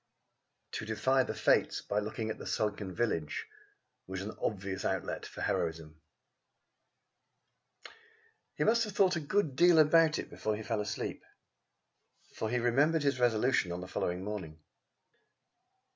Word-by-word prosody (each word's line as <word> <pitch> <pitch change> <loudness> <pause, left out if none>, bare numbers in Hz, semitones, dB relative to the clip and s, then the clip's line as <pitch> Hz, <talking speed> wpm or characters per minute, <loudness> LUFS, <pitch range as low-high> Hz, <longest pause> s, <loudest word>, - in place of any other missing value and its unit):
To - - -4
defy 130 +5 +2
the - - -3
Fates - - +2
by 105 - 0
looking 110 +1 -3
on - - -7
the - - -7
sunken 105 -2 -1
village 85 -6 -1 0.6
was 95 0 -4
an 105 - -6
obvious 95 -2 -2
outlet - - -2
for - - -9
heroism. 80 -1 -2 2.5
He 150 - 0
must 230 +6 +4
have 210 - -7
thought 190 -2 +3
a - - 0
good 155 -1 0
deal 175 +3 +6
about 155 0 +5
it - - -6
before 110 0 -2
he 110 - -6
fell 110 -1 -1
asleep, 105 0 -4 1.1
for 110 - -3
he 125 - 0
remembered 140 +7 +2
his 140 -2 +1
resolution 120 -5 +2
on 90 +1 -4
the 90 - -7
following 90 0 -2
morning. 95 -7 -5
110 Hz, 145 wpm, -32 LUFS, 95-145 Hz, 2.5 s, deal